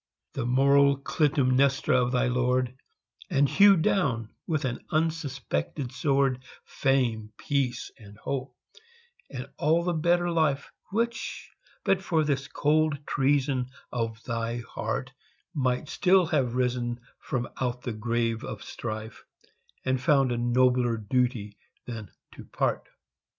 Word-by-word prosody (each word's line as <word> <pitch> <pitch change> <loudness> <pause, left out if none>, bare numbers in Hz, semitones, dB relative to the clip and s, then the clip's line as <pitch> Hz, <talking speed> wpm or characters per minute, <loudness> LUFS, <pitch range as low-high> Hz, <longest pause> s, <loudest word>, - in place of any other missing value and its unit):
The 120 - -2
moral 140 +2 +4
Clytemnestra 140 -1 +2
of 125 0 0
thy 125 0 +2
lord, 125 0 +1 0.6
And 140 +1 +3
hewed 195 0 +6
down, 120 - +1 0.2
with 155 -4 0
an 125 -2 -3
unsuspected 145 - -2
sword, 135 -1 +1 0.2
Fame, 120 -5 0
peace, 130 -4 -1
and 105 -2 -14
hope 130 +1 -4 0.7
and 130 -1 -6
all 160 +3 +3
the 175 0 0
better 175 +2 +2
life 155 -4 +1 0.2
Which, 230 +3 -2 0.3
but 195 -1 +3
for 165 -4 +1
this 140 -2 -1
cold 150 -1 +1
treason 135 -2 +1 0.2
of 115 -2 -3
thy 115 0 -3
heart, 130 +2 -3 0.4
Might 130 -1 0
still 185 +3 +4
have 135 -7 0
risen 125 -1 0 0.2
from 120 -2 -3
out 125 -1 -2
the 120 - -3
grave 115 0 -1
of - - -6
strife, 110 -1 -6 0.6
And 130 -1 +1
found 135 -1 +3
a 120 - 0
nobler 120 0 +3
duty 110 -2 -1 0.3
than 110 -5 -7 0.2
to - - -12
part. - - -1
130 Hz, 125 wpm, -27 LUFS, 120-145 Hz, 0.7 s, hewed